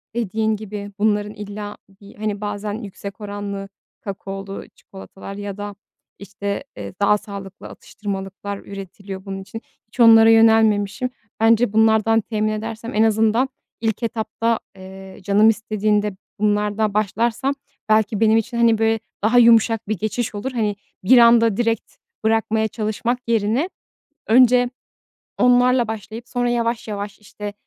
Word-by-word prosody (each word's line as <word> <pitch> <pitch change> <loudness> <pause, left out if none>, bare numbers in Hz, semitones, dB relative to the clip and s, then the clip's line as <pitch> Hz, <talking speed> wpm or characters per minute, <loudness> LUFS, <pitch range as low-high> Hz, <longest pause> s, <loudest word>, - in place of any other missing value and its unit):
dediğin 220 -1 0
gibi 205 -1 -7
bunların 210 0 +1
illa 205 0 -7 0.2
bir, 200 - -14
hani, 210 -1 -3
bazen 205 0 -4
yüksek 205 -1 -8
oranlı, 200 -1 -5 0.3
kakaolu 195 -2 -6
çikolatalar 195 0 -11
ya 205 -1 -6
da, 205 0 -6 0.4
işte, 200 +3 -5
eee, - - -7
daha 205 +1 +4
sağlıklı 200 -2 -9
atıştırmalıklar 200 0 -6
üretiliyor 195 0 -9
bunun 195 -1 -5
için. 225 +4 -9 0.3
Hiç 235 - -19
onlara 225 -1 +8
yönelmemişim. 225 0 +4 0.3
Bence 225 0 +3
bunlardan 220 0 +4
temin 215 0 -1
edersem 225 +2 -5
en 215 - +4
azından 225 +4 +2 0.3
ilk 225 0 -1
etapta, 230 0 -1 0.2
eee, 190 0 -11
canım 210 +3 +5
istediğinde 210 -1 0 0.3
bunlardan 210 0 +1
başlarsam 225 +6 0 0.4
belki 215 -1 +2
benim 220 0 +4
için, 235 +2 -2
hani, 230 -1 +4
bir 225 0 +2 0.2
daha 230 +3 +3
yumuşak 230 -2 +5
bir 215 -2 -1
geçiş 220 +2 -3
olur. 235 +6 -4
Hani, 215 -4 -1 0.3
bir 250 +7 +6
anda 230 -3 +6
direkt 230 -1 -1 0.3
bırakmaya 220 0 +1
çalışmak 220 +3 -2
yerine 230 - +1 0.6
önce 245 +1 +5 0.7
onlarla 250 -1 +4
başlayıp 220 +2 -7
sonra 245 -1 0
yavaş 235 -1 -1
yavaş 205 -1 -5
işte 210 0 -8
215 Hz, 130 wpm, -21 LUFS, 205-225 Hz, 0.7 s, onlara